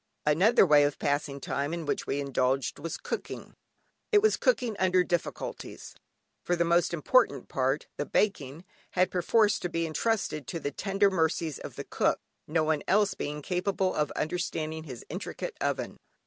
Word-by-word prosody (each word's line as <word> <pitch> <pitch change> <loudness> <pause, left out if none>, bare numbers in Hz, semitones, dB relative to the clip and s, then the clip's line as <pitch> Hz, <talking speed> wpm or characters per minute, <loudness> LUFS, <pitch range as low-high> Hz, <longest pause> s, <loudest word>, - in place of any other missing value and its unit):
Another 185 +10 +5
way 150 -3 +6
of 145 0 0
passing 145 -1 -1
time 140 +4 -2
in 170 -2 -5
which 145 - -2
we 140 - -1
indulged, 135 -1 0
was 165 +3 -4
cooking. - - -6 0.6
It 420 - +7
was 435 - +4
cooking 245 - +1
under 185 -1 +4
difficulties, 175 -1 -4 0.5
for 175 - +1
the 170 0 +1
most 170 +1 +3
important 155 - +2
part 135 +2 0
(the 145 - -2
baking) 165 -5 0 0.3
had 185 0 +2
perforce 205 +4 +3
to 180 - -3
be 165 0 -1
entrusted 160 - -1
to 165 - -4
the 145 - -3
tender 195 +5 +1
mercies 160 -3 0
of - - -8
the - - -5
cook, - - +1 0.3
no 155 +1 +1
one 155 -1 +1
else 205 0 +3
being 150 0 -5
capable 185 +2 0
of 150 -1 0
understanding 160 -1 -3
his 130 -6 -9
intricate - - -5
oven. - - -2
165 Hz, 165 wpm, -29 LUFS, 145-185 Hz, 0.6 s, It